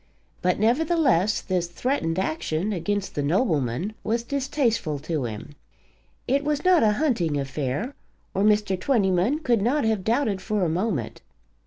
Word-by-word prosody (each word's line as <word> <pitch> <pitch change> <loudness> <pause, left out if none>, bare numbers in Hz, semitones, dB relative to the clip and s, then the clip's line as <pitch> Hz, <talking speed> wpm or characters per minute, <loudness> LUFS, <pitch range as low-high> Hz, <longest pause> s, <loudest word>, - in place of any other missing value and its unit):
But, 180 0 +1
nevertheless, 245 - +2
this 180 -2 -1
threatened 170 - -1
action 170 +2 -1
against 200 +3 -2
the 145 - -2
nobleman 155 - 0
was 230 +2 -1
distasteful 250 - -1
to 150 -1 -3
him. 110 +5 -7 0.7
It 275 +3 +2
was 295 +2 -1
not 365 -3 +5
a 215 -1 +4
hunting 210 - 0
affair, 140 - -3 0.4
or 195 - 0
Mr. 210 -2 +2
Twentyman 205 - +1
could 235 -7 +2
not 260 +8 +1
have 220 -4 0
doubted 220 -4 0
for 210 0 -1
a - - 0
moment. 170 - -2
205 Hz, 145 wpm, -25 LUFS, 165-245 Hz, 0.7 s, not